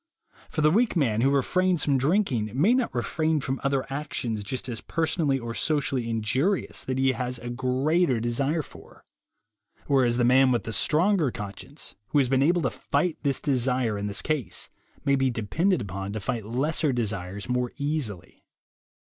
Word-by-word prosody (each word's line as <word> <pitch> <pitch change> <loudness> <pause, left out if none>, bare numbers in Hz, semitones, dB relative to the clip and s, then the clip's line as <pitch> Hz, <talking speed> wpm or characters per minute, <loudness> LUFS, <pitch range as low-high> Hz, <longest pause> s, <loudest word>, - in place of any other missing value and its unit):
For 155 - -2
the 155 0 +5
weak 225 +5 +2
man 115 -9 +2
who 135 - +4
refrains 175 +5 +1
from 140 -2 +2
drinking 135 - +1
may 200 +11 +5
not 255 -2 +1
refrain 155 +6 0
from 135 -1 -3
other 135 -1 0
actions 125 -7 -3
just 130 +6 -4
as 120 -3 -4
personally 160 -3 0
or 115 -2 -5
socially 135 -4 0
injurious 125 - 0
that 130 0 -2
he 135 0 +3
has 125 0 -3
a 120 +1 -6
greater 130 +3 +1
desire 135 +7 0
for; - - -16 0.8
whereas 130 -4 +2
the 125 - +2
man 130 +2 +5
with 120 - +1
the 115 - -5
stronger 165 - +2
conscience, 105 -4 -8
who - - 0
has 135 -3 +3
been 135 0 +3
able 170 +4 +3
to 130 - +1
fight 150 +4 -1
this 140 -3 +1
desire 125 -4 +1
in 100 0 -3
this 100 - -2
case, 135 - -2 0.3
may 140 - +4
be 135 -1 +2
depended 130 - 0
upon 100 +1 -5
to 110 - -3
fight 110 +1 -3
lesser 145 +5 0
desires 100 -5 -3
more 125 0 -1
easily. 140 - -4
130 Hz, 175 wpm, -26 LUFS, 115-150 Hz, 0.8 s, the